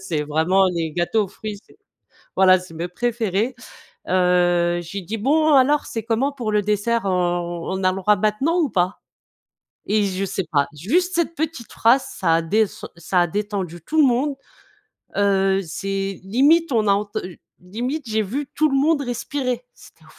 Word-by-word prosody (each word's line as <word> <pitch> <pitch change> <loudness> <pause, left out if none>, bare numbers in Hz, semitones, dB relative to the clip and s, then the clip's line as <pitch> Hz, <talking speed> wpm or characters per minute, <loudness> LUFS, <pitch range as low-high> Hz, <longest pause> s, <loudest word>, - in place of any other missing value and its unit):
C'est 170 -6 -2
vraiment 160 +6 +2
les 165 -2 -2
gâteaux 175 +6 0
aux - - -9
fruits, 210 +1 -7
c'est - - -22 0.6
voilà, 185 -1 +6
c'est 180 -3 -12
mes 170 +2 -4
préférés. 230 +2 -1 0.6
Heu, 175 -1 +2
j'ai 190 +4 -6
dit: 215 +6 -5
«Bon 305 +7 +3
alors, 280 +2 +4
c'est 225 -2 -5
comment 240 +5 0
pour 240 -6 -4
le 210 0 +2
dessert? 210 +3 0
On 175 -2 -1
on 190 0 -3
à 185 - +4
le 185 - -5
droit 205 +2 +3
maintenant 240 +12 0
ou 300 -6 +1
pas?», 180 +1 0 0.9
et 210 0 +2
je 190 +1 -2
sais 190 -1 -3
pas, 140 -3 +2
juste 345 - 0
cette 335 0 0
petite 305 -5 -4
phrase, 255 +4 +3
ça 165 -4 0
a 165 - 0
descen 210 +5 -1
ça 175 +2 0
a 175 - +3
détendu 195 -2 -4
tout 315 - 0
le 290 - +6
monde. 265 +4 +1 0.8
Heu, 195 -1 +2
c'est 195 +3 -4
limite, 285 - +3
on 220 -3 +2
a 200 - +5
enten 200 -3 -3 0.2
limite, 245 - -4
j'ai 220 0 +1
vu 265 +8 -4
tout 310 0 +3
le 275 - +1
monde 290 +1 +2
respirer, 255 - -3
c'était - - -19
205 Hz, 180 wpm, -21 LUFS, 180-255 Hz, 0.9 s, voilà